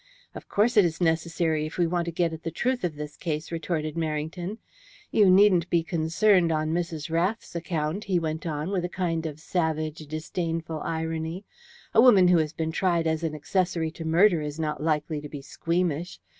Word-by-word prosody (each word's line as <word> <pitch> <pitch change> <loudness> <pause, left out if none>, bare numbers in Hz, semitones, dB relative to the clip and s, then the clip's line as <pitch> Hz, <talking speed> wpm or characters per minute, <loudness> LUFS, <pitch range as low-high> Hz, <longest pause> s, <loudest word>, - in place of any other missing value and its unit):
"Of - - -10
course 225 +3 +2
it 205 - +8
is 165 -2 -1
necessary 160 -2 +1
if 155 - -9
we 175 - +3
want 170 0 0
to 170 - -3
get 170 0 0
at 160 - -7
the 165 - -3
truth 245 +9 -1
of 170 -4 -1
this 150 0 -7
case," 155 -1 -4
retorted 160 -2 -2
Merrington. 165 +5 -3 0.5
"You 205 -3 +5
needn't 185 -3 +5
be 170 -2 +2
concerned 170 +3 +2
on 155 0 0
Mrs. 165 -2 -3
Rath's 180 +5 -1
account," 165 +3 -2
he 190 -3 +1
went 160 0 -2
on, 155 +3 -3
with 185 -3 0
a 175 - -2
kind 165 -3 -2
of 150 -1 -8
savage, 155 -2 -1
disdainful 165 +1 -3
irony. 160 +4 -3 0.5
"A 225 - +7
woman 200 -8 +7
who 175 -2 +5
has 155 -2 0
been 160 0 -3
tried 170 -1 +1
as 160 0 0
an 160 -2 -2
accessory 170 +1 -1
to 165 - -8
murder 170 +2 +4
is 150 +1 -5
not 150 -2 -2
likely 155 -1 -1
to 150 - -8
be 140 -2 -8
squeamish. 170 +2 -2
165 Hz, 195 wpm, -26 LUFS, 155-180 Hz, 0.5 s, it